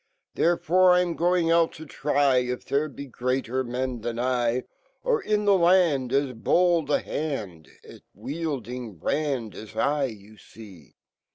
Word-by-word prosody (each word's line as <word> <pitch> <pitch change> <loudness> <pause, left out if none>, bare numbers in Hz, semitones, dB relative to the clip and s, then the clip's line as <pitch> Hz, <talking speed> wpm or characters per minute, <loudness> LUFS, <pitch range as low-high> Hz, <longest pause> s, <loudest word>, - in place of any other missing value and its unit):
Therefore, 175 +2 +3
I 180 - +4
'm 175 -2 -3
ging 175 -1 +2
ut 165 -1 +3
to 160 - -10
try 140 -2 +1
If 125 0 -2
fhere 145 +2 0
Lc 140 -1 -10
gre/ater 130 +1 -1
men 125 -1 -3
fhan 115 +1 -4
I; 125 -1 0 0.4
Orinfhe 215 - 0
land 170 -8 +3
As 140 -2 +1
bold 170 +5 +2
a 145 - +2
hand 105 - -5 0.2
At - - -13
wielding 125 - -5
brand 130 - -2
a* 110 - -9
I 145 0 +1
,yu 110 -3 -10 0.5
(ec - - -33
140 Hz, 145 wpm, -25 LUFS, 125-165 Hz, 0.5 s, I